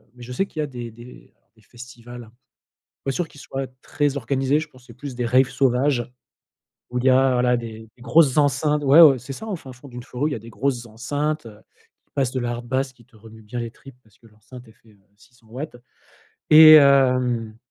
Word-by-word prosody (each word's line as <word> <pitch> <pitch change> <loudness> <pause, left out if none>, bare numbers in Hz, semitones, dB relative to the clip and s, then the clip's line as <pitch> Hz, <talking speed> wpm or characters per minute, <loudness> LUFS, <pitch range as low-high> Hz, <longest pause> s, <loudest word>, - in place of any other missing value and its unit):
mais 120 - -13
je 125 +1 -8
sais 195 - 0
qu'il 160 - -10
y - - 0
a - - -4
des 120 -3 -8
des, 120 +2 -14 0.3
heu, - - -43 0.2
des 110 - -25
festivals, 120 0 -12 0.8
pas 135 - -1
sûr 165 +3 -3
qu'ils 145 - -16
soient 135 0 -6
très 145 -1 -1
organisés, 135 +3 0
je 155 - -6
pense 130 -3 -21
c'est 115 - -14
plus 135 0 -8
des 120 0 -3
raves 130 +2 +3
sauvages 125 -1 0 0.8
où 125 - -6
il 125 - -4
y 130 - +5
a, 130 0 +4
voilà, 125 0 +2
des 110 -2 -8 0.2
des 120 - -18
grosses 135 +2 +3
enceintes 145 +1 +1
ouais, 140 +5 +7
ouais, 140 -5 +7
c'est 135 +3 -9
ça, 220 - -9
au 200 -4 -3
fin 135 -5 -12
fond 135 +3 -15
d'une 125 -1 -9
forêt, 130 +2 -5
ou - - +2
il - - -5
y - - -1
a - - -6
des 115 +2 -14
grosses 125 -1 -3
enceintes, 145 +6 -3
heu, 105 -2 -12 0.5
qui - - -44
passent 135 -3 0
de 130 - -2
la 120 0 -3
hardbass 130 +3 -3
qui 120 - -22
te 125 - -30
remue 110 +1 -15
bien 120 +3 -6
les 115 -1 -5
tripes, 135 -2 -16
parce 110 - -27
que 115 - -22
l'enceinte 110 +4 -15
elle - - -17
fait, 115 - -28
heu, 100 -2 -25 0.2
600 120 -2 -24
watts 130 +1 -7 0.7
et 155 0 +10
hem, 125 -6 +3
125 Hz, 240 wpm, -22 LUFS, 120-140 Hz, 0.8 s, et